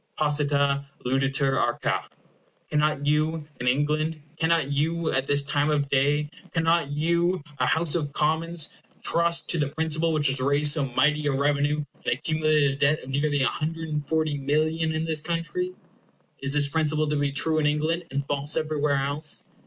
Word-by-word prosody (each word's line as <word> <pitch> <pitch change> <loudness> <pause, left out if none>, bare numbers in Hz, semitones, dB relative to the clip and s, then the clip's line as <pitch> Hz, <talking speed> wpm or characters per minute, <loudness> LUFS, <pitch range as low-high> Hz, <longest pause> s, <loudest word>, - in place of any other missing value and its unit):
Posita 140 -2 +1 0.2
luditur 135 +1 +1
arca. - - -1 0.6
Cannot 150 -1 +1
you, 155 +1 0
in 125 - -3
England 150 +4 +1 0.2
cannot 160 -3 +1
you, 160 +3 0
at 135 +1 0
this 145 0 +3
time 145 +1 +1
of 145 -2 0
day 145 +2 +2 0.2
cannot 165 -2 +2
you, 170 +3 +1 0.2
a 125 - +2
House 160 +2 +1
of 150 -4 -1
Commons, 160 +2 0 0.3
trust 170 0 +2
to 170 - 0
the 145 - +1
principle 160 +2 0
which 155 -2 0
has 135 -1 +1
raised 145 +2 +2
so 155 -4 0
mighty 150 +4 +1
a - - +2
revenue, 145 +2 +1 0.2
and - - +1
accumulated 155 0 +1
a 135 - -5
debt 145 +2 +2
of 130 - -10
near 145 +3 +1
140,000,000 155 +1 -1
in 160 0 -1
this 160 -2 +2
country? 170 - -2 0.7
Is 140 0 0
this 145 -1 +3
principle 155 +1 0
to 150 - 0
be 145 -1 0
true 155 +2 +1
in 150 - +2
England, 155 +4 0
and 140 +1 -3
false 145 +1 0
everywhere 150 -2 0
else? 145 +3 0
150 Hz, 160 wpm, -25 LUFS, 140-160 Hz, 0.7 s, this